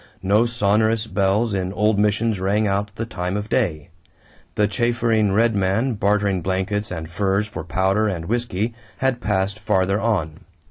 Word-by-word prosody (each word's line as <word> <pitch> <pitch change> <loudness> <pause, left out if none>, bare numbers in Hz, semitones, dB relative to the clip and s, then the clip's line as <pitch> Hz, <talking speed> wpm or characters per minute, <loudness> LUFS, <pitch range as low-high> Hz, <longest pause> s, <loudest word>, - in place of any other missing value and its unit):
No 105 +5 +3
sonorous 110 0 +1
bells 100 +2 +1
in 95 -1 -1
old 105 0 +2
missions 105 0 +1
rang 100 +3 +1
out 100 0 0
the 115 - -3
time 90 -3 -3
of 105 +1 -5
day. 75 0 -1 0.7
The 105 - +3
chaffering 115 -1 +1
Red 115 +2 +2
Man 100 +7 +1
bartering 100 -2 +1
blankets 95 +4 -2
and 80 -3 -5
furs 95 +4 0
for 80 -7 -7
powder 95 +6 +1
and 85 -5 -3
whisky 115 0 -2 0.2
had 130 -2 0
passed 100 0 -1
farther 95 -1 +1
on. 85 -9 -1
100 Hz, 155 wpm, -22 LUFS, 95-110 Hz, 0.7 s, No